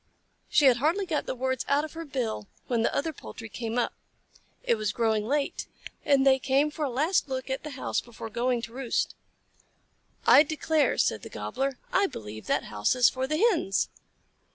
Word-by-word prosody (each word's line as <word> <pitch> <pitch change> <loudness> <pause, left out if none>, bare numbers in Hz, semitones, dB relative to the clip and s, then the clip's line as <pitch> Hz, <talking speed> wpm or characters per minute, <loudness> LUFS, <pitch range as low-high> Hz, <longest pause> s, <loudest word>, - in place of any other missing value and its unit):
She 300 - +4
had 255 -3 +6
hardly 325 +10 +1
got 320 -4 -2
the - - -2
words 260 0 -1
out 285 +2 +2
of 310 - -10
her 330 0 -6
bill 240 -7 -3 0.2
when 235 -2 0
the - - +2
other 320 +3 -1
poultry 225 -5 -9
came 230 +1 -4
up. 245 - +1 0.7
It - - +3
was 215 -2 -1
growing 220 -2 0
late, 285 +2 -1 0.4
and 275 -2 +4
they 265 -1 +5
came 275 +3 +2
for 305 0 -4
a 285 - 0
last 295 +5 +1
look 260 0 -3
at 265 - -2
the 305 - -5
house - - -1
before 225 -1 -9
going 240 +1 0
to 230 - -7
roost. 255 -2 -1 1.1
"I - - +9
declare," 310 -2 +1
said 110 - +1
the - - -9
Gobbler, 260 - -3 0.2
"I 395 +1 +4
believe 110 - -8
that - - +1
house 105 - 0
is 250 -1 +6
for 260 0 -2
the 305 - 0
Hens!" 340 - +2
260 Hz, 195 wpm, -28 LUFS, 230-295 Hz, 1.1 s, I